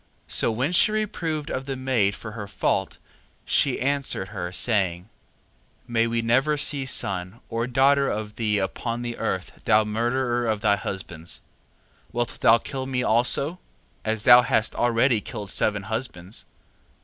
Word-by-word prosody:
3:9. - - -9
So - - +3
when 130 +8 -1
she 180 +4 +4
reproved 170 -8 -2 0.2
the 135 - -2
maid 125 -6 +1
for 110 - -8
her 105 -2 -7
fault, - - -1 0.5
she - - +2
answered 135 -8 -1
her, 90 -4 -5
saying: 95 -3 0 0.8
May 115 -1 +1
we 115 0 -1
never 135 +6 +2
see 140 -2 +1
son, 95 -3 -1
or 115 +1 -1
daughter 135 +2 +3
of 105 0 -4
thee 105 -2 0
upon 115 +5 -3
the 120 -1 -5
earth, 95 -5 -3
thou 110 -2 +5
murderer 120 +3 0
of 110 -2 0
thy 100 - +3
husbands. 90 -5 -5 0.7
3:10. - - -30
Wilt 120 0 -2
thou 115 - +6
kill 130 +3 -6
me 125 -2 -1
also, 130 +9 +2 0.4
as 110 -1 -1
thou 120 +1 +9
hast 110 -2 +1
already 120 -1 +2
killed 100 -2 -6
seven 105 -2 +1
husbands? 105 -3 -5
115 Hz, 155 wpm, -24 LUFS, 105-130 Hz, 0.8 s, thou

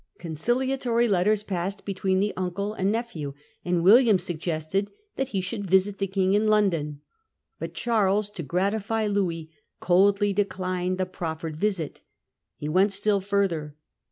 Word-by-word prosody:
Conciliatory 240 - 0
letters 205 +1 +2
passed 195 0 -3
between 190 -1 0
the 205 +2 +1
uncle 185 +3 -3
and 195 -2 0
nephew, 175 - -4 0.3
and 175 -1 0
William 220 +2 +7
sug 175 -2 -3
gested 165 +4 -2 0.3
that 270 - -1
he 200 -7 -2
should 195 +1 -4
visit 190 +2 +3
the 195 - 0
King 190 0 +1
in 210 +1 +2
London. 170 -9 +1 0.6
But - - -6
Charles, 210 -3 +1
to 185 - -6
gratify 200 - -1
Louis, 175 -6 -1 0.3
coldly 200 +3 +3
declined 185 -2 -1
the 185 - 0
proffered 160 -3 -5
visit. 190 -5 -2 0.6
He 150 - -5
went 190 +6 +3
still 200 0 +1
further. 185 -7 -1
195 Hz, 145 wpm, -26 LUFS, 175-205 Hz, 0.6 s, William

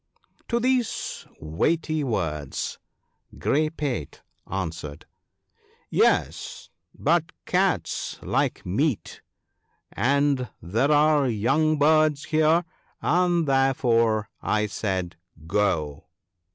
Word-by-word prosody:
' - - -38
To 235 - +1
these 250 -1 -1
weighty 155 - 0
words 80 - -3 0.6
Grey 155 +2 +1
pate 140 - -4 0.3
answered, 80 -6 -5 0.5
" - - -39 0.3
Yes! - - 0 0.3
but - - +1
cats - - 0
like - - -1
meat, 120 - -1 0.7
and 135 +1 +1
there 115 - 0
are 150 -1 +4
young 135 +8 +1
birds 155 0 +3
here, 160 +2 +2 0.3
and 175 -1 +2
therefore 120 -5 +2
I 105 0 +1
said, 95 -5 -3 0.3
go." 80 -6 0
135 Hz, 90 wpm, -25 LUFS, 100-155 Hz, 0.7 s, are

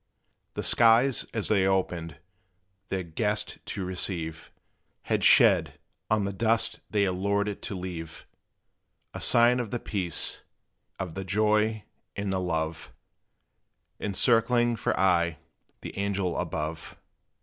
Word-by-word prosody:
The - - -3
skies, 120 +3 +4
as 110 -3 -3
they 95 -3 +2
opened, 85 -4 -1 0.7
their 95 -1 -2
guest 105 +6 -1
to 95 - -4
receive, 85 -3 -3 0.5
Had - - -1
shed, - - +5 0.3
on 110 -2 +2
the 100 - -3
dust 115 +2 0
they 105 -2 +2
allured 100 +2 0
it 105 - -5
to 100 - -5
leave, 85 -3 -7 0.9
A - - -7
sign 120 +1 +5
of 120 -3 -3
the 120 - -2
peace, 90 -8 -2 0.6
of 90 -4 -5
the 95 - -5
joy, 105 +2 +1 0.3
and 100 -1 -2
the 95 - 0
love, 80 -3 -3 1.1
Encircling 120 +3 +2
for - - -2
aye 85 -3 +2 0.4
the - - -7
young 100 - -1
angel 95 -3 -1
above. 80 +1 -5
100 Hz, 125 wpm, -27 LUFS, 90-110 Hz, 1.1 s, shed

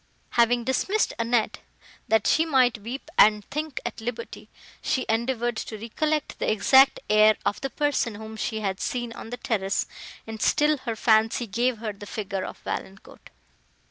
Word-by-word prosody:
Having 235 0 +3
dismissed 380 - 0
Annette, 230 -1 0 0.5
that 220 -2 +2
she 320 - +4
might 255 -8 +3
weep 250 +9 -7
and 210 -1 +6
think 300 -1 -3
at 235 -1 -5
liberty, 230 0 -6 0.3
she 260 -4 -1
endeavoured 235 +1 0
to 220 - -5
recollect 300 +8 -2
the - - +1
exact 265 +5 +5
air 215 0 +5
of 205 - -1
the 270 - -2
person, 275 -5 0
whom 220 +1 -8
she 220 0 -3
had 195 -2 -2
seen 240 -2 -3
on 225 - -9
the 245 - -5
terrace, 200 -5 -1 0.4
and 220 -1 -7
still 300 0 +3
her 225 - -1
fancy 220 +2 +3
gave 235 +4 0
her 215 -1 -4
the 205 +1 -11
figure 200 -3 -4
of - - -7
Valancourt. 195 +1 -7
230 Hz, 165 wpm, -25 LUFS, 215-255 Hz, 0.5 s, and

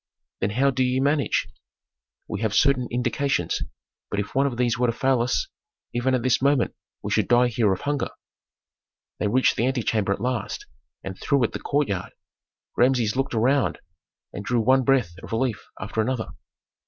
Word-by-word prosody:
"Then 95 - 0
how 135 +6 +2
do 130 0 +1
ye 125 +1 +1
manage?" 140 +1 +1 0.8
"We 105 - -4
have 110 -2 0
certain 135 -3 +3
indications, 125 - 0 0.5
but 100 - -2
if 100 +1 -4
one 135 +1 +3
of 125 -4 -4
these 120 -2 +2
were 125 - +3
to 115 - +1
fail 130 0 +2
us, 120 +1 0 0.5
even 125 +2 +1
at 125 - -1
this 130 -1 +2
moment 140 -2 +2 0.3
we - - -4
should - - +2
die 120 0 +4
here 115 -4 +2
of 95 - -2
hunger." 145 -1 -1 1.1
They - - +1
reached 125 +5 +3
the 120 - +2
antechamber 110 -6 0
at 100 - 0
last 125 -3 -3 0.4
and 95 -1 -7
through 140 -3 +2
it 115 - +1
the - - -5
courtyard. 110 -11 -1 0.6
Rameses 120 -3 +2
looked 135 -2 -1
around 130 +5 +2 0.6
and 100 - -6
drew 120 +3 +1
one 130 +3 +4
breath 125 -9 +2
of - - -10
relief 115 -2 -1
after 105 +3 -2
another. 120 0 -2
125 Hz, 180 wpm, -24 LUFS, 110-130 Hz, 1.1 s, die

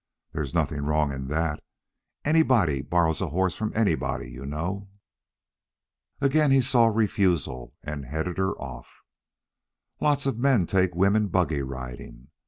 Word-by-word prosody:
There's 70 -4 -3
nothing 75 -3 0
wrong 75 0 +1
in 65 -1 -5
that. 75 +1 -1 0.6
Anybody 130 - +3
borrows 80 +3 +1
a 95 - 0
horse 95 +4 0
from 110 -1 -2
anybody, 80 - 0
you 65 +2 -8
know." 90 +7 -4 1.3
Agin 145 +2 +3
he 135 0 +5
saw 120 -2 +4
refusal, 95 - 0
and 75 -2 -5
headed 80 +7 -3
her 95 0 0
off. 65 -2 -8 1.1
"Lots 145 -2 +1
of 135 -4 -1
men 125 -8 +3
take 90 -1 +1
women 100 +4 +3
buggy 85 -6 +1
riding. 65 -1 -8
85 Hz, 135 wpm, -26 LUFS, 70-110 Hz, 1.3 s, he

